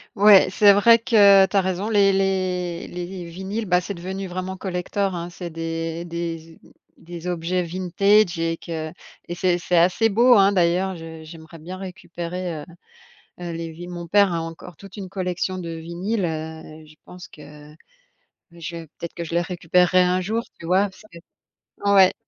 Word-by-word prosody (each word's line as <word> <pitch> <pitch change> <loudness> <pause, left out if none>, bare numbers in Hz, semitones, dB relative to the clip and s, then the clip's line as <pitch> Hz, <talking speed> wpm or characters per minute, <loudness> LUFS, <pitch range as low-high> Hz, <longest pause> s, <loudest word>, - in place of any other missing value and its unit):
Ouais, 205 -2 +7
c'est 200 +1 +6
vrai 230 +3 +6
que 200 -4 +6
tu 190 - -7
as 195 - +5
raison, 190 +2 -2
les 200 -2 +4
les 185 -3 -1
les 180 0 -7
vinyles, 195 +5 -5
bah, 180 0 +3
c'est 200 +3 -5
devenu 190 +2 -6
vraiment 185 +1 -5
collector, 190 +1 -2
hein, 170 +1 -5
c'est 175 -1 -8
des 165 +1 -4
des 165 -1 -5
ob - - -19 0.4
des 175 +1 -9
objets 175 +1 -1
vintage 185 +2 +2
et 165 0 -1
que 160 -2 -6 0.4
et 175 - -5
c'est 180 -1 +1
c'est 175 0 0
assez 185 +6 +3
beau, 240 +4 +5
hein, 200 0 +5
d'ailleurs, 185 +1 +1
je 165 -1 -10
j'aimerais 160 0 -12
bien 180 +4 -8
récupérer, 180 -3 -6
heu - - -12 0.8
heu, 175 -1 -5
les 165 0 -5
vi 175 +2 -9
mon 175 -1 -7
père 200 +1 +4
a 165 - -1
encore 165 0 -9
toute 195 +4 -13
une 190 -2 -6
collection 185 0 -3
de 170 -2 -6
vinyles, 175 +5 -3
heu, 160 0 -7
je 155 - -17
pense 180 0 -11
que 150 0 -14 0.8
je 170 0 -7
vais 165 -1 -8
peut-être 170 +2 -9
que 170 - -5
je 165 - -6
les 170 - +3
récupérerais 180 +1 +2
un 180 +1 +1
jour, 220 +5 -2 0.2
tu 165 - -8
vois? 185 +3 +3
Parce 190 - -18
que 170 - -12 0.7
ouais. 190 -2 +6
180 Hz, 185 wpm, -22 LUFS, 165-190 Hz, 0.8 s, Ouais